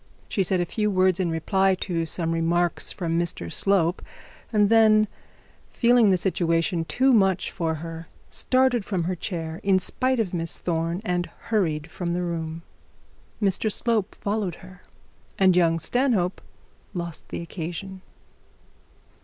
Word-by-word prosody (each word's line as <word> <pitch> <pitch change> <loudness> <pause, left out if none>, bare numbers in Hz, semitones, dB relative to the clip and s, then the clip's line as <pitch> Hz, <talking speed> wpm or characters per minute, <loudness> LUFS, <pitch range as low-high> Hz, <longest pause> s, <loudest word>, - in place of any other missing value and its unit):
She 200 - -1
said 185 0 +1
a 175 - +1
few 210 +4 -1
words 185 -2 +2
in 180 -2 +1
reply 190 +4 +2
to 165 -3 -1
some 165 0 -1
remarks 170 +1 0
from 170 -3 -1
Mr 165 - -3
Slope, 185 -3 +2 0.5
and 210 -2 +4
then 215 -1 +6 0.6
feeling 240 -3 +4
the 185 - +4
situation 170 -2 0
too 260 +8 +3
much 195 -5 +2
for 165 -3 -1
her, 165 +1 -7 0.2
started 255 -3 +2
from 190 -4 -2
her 180 +3 -1
chair 165 -3 -4
in 195 -1 +3
spite 255 +6 0
of 200 -5 -1
Miss 165 -1 -2
Thorne, 170 +2 -2
and 175 -2 0 0.2
hurried 165 -8 0
from 170 0 -3
the 180 +1 -1
room. 165 -1 -4 0.8
Mr 205 +1 0
Slope 220 -2 0
followed 200 -4 -2
her, 185 0 -14 0.6
and 190 -2 +5
young 165 -2 +3
Stanhope 200 - 0 0.5
lost 170 -2 -5
the - - -4
occasion. 175 +3 -6
180 Hz, 145 wpm, -25 LUFS, 165-205 Hz, 0.8 s, then